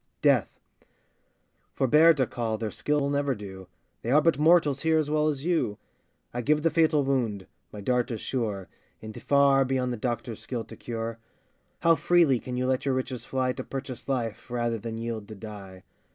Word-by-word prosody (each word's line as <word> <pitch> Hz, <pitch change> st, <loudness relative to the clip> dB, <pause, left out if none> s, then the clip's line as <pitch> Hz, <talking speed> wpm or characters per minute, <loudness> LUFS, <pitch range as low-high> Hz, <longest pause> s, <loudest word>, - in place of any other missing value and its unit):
DEATH. -, -, +2 dB, 1.2 s
Forbear 150 Hz, +5 st, +6 dB
to 135 Hz, -3 st, +2 dB
call, 115 Hz, -2 st, -3 dB
their 110 Hz, -1 st, -3 dB
skill 150 Hz, 0 st, 0 dB
will 140 Hz, 0 st, 0 dB
never 140 Hz, -2 st, 0 dB
do, 95 Hz, -3 st, -9 dB, 0.3 s
They 115 Hz, -, -4 dB
are 145 Hz, +4 st, +6 dB
but 165 Hz, -4 st, +3 dB
mortals 150 Hz, -3 st, +4 dB
here 160 Hz, -1 st, +3 dB
as 150 Hz, -1 st, 0 dB
well 155 Hz, 0 st, +2 dB
as 145 Hz, -1 st, -2 dB
you: 165 Hz, -, 0 dB, 0.6 s
I 120 Hz, -, -2 dB
give 150 Hz, +4 st, +1 dB
the 165 Hz, -, +3 dB
fatal 155 Hz, -2 st, +3 dB
wound, 120 Hz, -8 st, -1 dB, 0.3 s
my 105 Hz, -, -8 dB
dart 125 Hz, +3 st, +1 dB
is 115 Hz, -3 st, -4 dB
sure, 105 Hz, -8 st, -3 dB, 0.3 s
And 110 Hz, -1 st, -9 dB
far 140 Hz, -1 st, +4 dB
beyond 130 Hz, -1 st, -1 dB
the -, -, -4 dB
doctor's 120 Hz, -1 st, -3 dB
skill 120 Hz, -3 st, -4 dB
to -, -, -12 dB
cure. 115 Hz, -1 st, -5 dB, 0.6 s
How 165 Hz, -, +5 dB
freely 160 Hz, -4 st, +3 dB
can 125 Hz, +1 st, -5 dB
you 125 Hz, -, 0 dB
let 130 Hz, +1 st, 0 dB
your 135 Hz, -2 st, +1 dB
riches 130 Hz, -2 st, -3 dB
fly 130 Hz, -1 st, 0 dB
To -, -, -6 dB
purchase 135 Hz, -2 st, -7 dB
life, 120 Hz, -4 st, -3 dB
rather 120 Hz, -1 st, -1 dB
than 115 Hz, +1 st, -5 dB
yield 115 Hz, -2 st, -4 dB
to 110 Hz, -, -9 dB
die! 100 Hz, -3 st, -10 dB
125 Hz, 190 wpm, -27 LUFS, 115-145 Hz, 1.2 s, Forbear